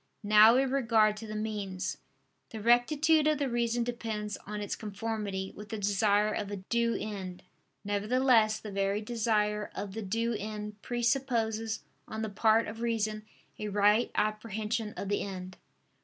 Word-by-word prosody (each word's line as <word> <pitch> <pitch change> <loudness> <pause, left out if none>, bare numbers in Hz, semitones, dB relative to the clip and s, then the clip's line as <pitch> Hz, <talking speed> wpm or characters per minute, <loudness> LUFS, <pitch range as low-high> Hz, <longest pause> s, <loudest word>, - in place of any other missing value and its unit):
Now 215 +2 +7
in 265 0 +2
regard 225 -5 +3
to 220 - -7
the 215 - -6
means, 205 -3 -3 0.5
the 220 - -7
rectitude 295 +7 +4
of 305 -1 +3
the 280 -1 0
reason 240 -1 0
depends 220 -3 -3
on 210 0 -4
its 205 - -3
conformity 210 -2 -4
with 210 0 -10
the 220 - -4
desire 205 +1 +2
of 205 -2 -3
a 205 - -3
due 230 +4 0
end: 190 -4 -6 0.4
nevertheless 215 +2 +3
the 215 -1 -8
very 200 +1 0
desire 210 -2 0
of 200 -2 -5
the 225 - -4
due 230 +4 -1
end 210 0 -5
presupposes 230 -3 0 0.2
on 220 0 -4
the 220 - -2
part 220 +2 +3
of 225 +2 -7
reason 215 -2 -1 0.3
a 210 - -3
right 210 +3 +3
apprehension 215 +1 -1
of 200 - -4
the 205 +1 0
end. 185 -2 -6
215 Hz, 155 wpm, -30 LUFS, 205-230 Hz, 0.5 s, Now